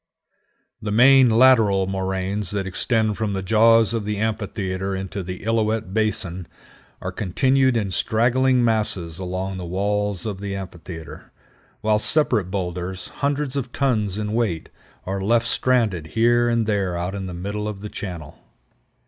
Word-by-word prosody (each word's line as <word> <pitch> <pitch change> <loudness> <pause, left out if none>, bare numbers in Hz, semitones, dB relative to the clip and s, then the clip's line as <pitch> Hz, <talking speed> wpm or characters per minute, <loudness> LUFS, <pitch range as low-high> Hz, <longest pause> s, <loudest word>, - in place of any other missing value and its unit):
The 105 -1 -3
main 130 +3 +6
lateral 110 -5 +5
moraines 95 +1 -2
that 100 -2 -2
extend 110 +2 0
from 110 -2 -1
the 95 -1 -3
jaws 115 +2 +4
of 115 -2 -1
the 105 0 -3
amphitheater 100 -3 -2
into 95 +1 -4
the 90 0 -7
Illilouette 110 -3 0
Basin 105 -5 -1 0.5
are - - -4
continued 130 +6 +2
in 100 -4 -1
straggling 120 +7 +2
masses 100 -7 -1
along 95 +1 -4
the 90 - -6
walls 100 +1 -1
of 100 -3 -4
the 100 -1 -4
amphitheater, 85 -4 -9 0.5
while 105 0 +2
separate 115 - +2
boulders, 90 -1 -4
hundreds 140 -1 -1
of 130 -3 -3
tons 110 -9 0
in 105 0 -3
weight, 110 -9 -1 0.4
are 95 +1 -3
left 115 +4 +2
stranded 110 -13 +1
here 120 +4 +2
and 115 -1 +1
there 100 -4 -1
out 90 +2 -3
in 95 -2 -4
the 90 - -6
middle 100 +4 -4
of 105 -2 -6
the 105 - -5
channel. 90 -9 -7
105 Hz, 150 wpm, -22 LUFS, 95-115 Hz, 0.5 s, main